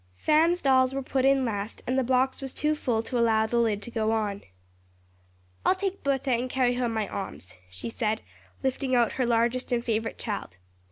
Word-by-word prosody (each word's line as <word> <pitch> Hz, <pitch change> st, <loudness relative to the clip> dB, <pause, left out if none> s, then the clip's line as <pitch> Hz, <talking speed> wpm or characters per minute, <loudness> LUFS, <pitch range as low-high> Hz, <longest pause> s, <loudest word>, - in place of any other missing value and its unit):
Fan's 325 Hz, -, +3 dB
dolls 260 Hz, -1 st, +4 dB
were 275 Hz, -, -2 dB
put 260 Hz, 0 st, 0 dB
in 270 Hz, -1 st, +4 dB
last 210 Hz, -2 st, -4 dB
and 255 Hz, -, 0 dB
the 265 Hz, -, +3 dB
box 260 Hz, +2 st, +1 dB
was 270 Hz, -1 st, -6 dB
too 300 Hz, 0 st, +1 dB
full 240 Hz, -7 st, -1 dB
to 245 Hz, +1 st, -2 dB
allow 220 Hz, -2 st, +3 dB
the 235 Hz, +2 st, 0 dB
lid 215 Hz, -3 st, +1 dB
to 235 Hz, -, -7 dB
go 220 Hz, -1 st, 0 dB
on. 210 Hz, -3 st, -1 dB, 1.2 s
"I'll -, -, +4 dB
take 390 Hz, 0 st, -3 dB
Bertha 275 Hz, -1 st, 0 dB
and 245 Hz, +1 st, 0 dB
carry 250 Hz, -1 st, +2 dB
her 245 Hz, 0 st, 0 dB
in -, -, -2 dB
my 220 Hz, -2 st, -1 dB
arms," 95 Hz, -, -7 dB, 0.2 s
she 95 Hz, +5 st, -6 dB
said, 220 Hz, -, -1 dB, 0.4 s
lifting 265 Hz, 0 st, 0 dB
out 235 Hz, -2 st, +3 dB
her 250 Hz, -, +2 dB
largest 235 Hz, +2 st, +1 dB
and 240 Hz, -1 st, 0 dB
favorite 225 Hz, -1 st, -1 dB
child. 200 Hz, -, -5 dB
245 Hz, 205 wpm, -27 LUFS, 220-265 Hz, 1.2 s, dolls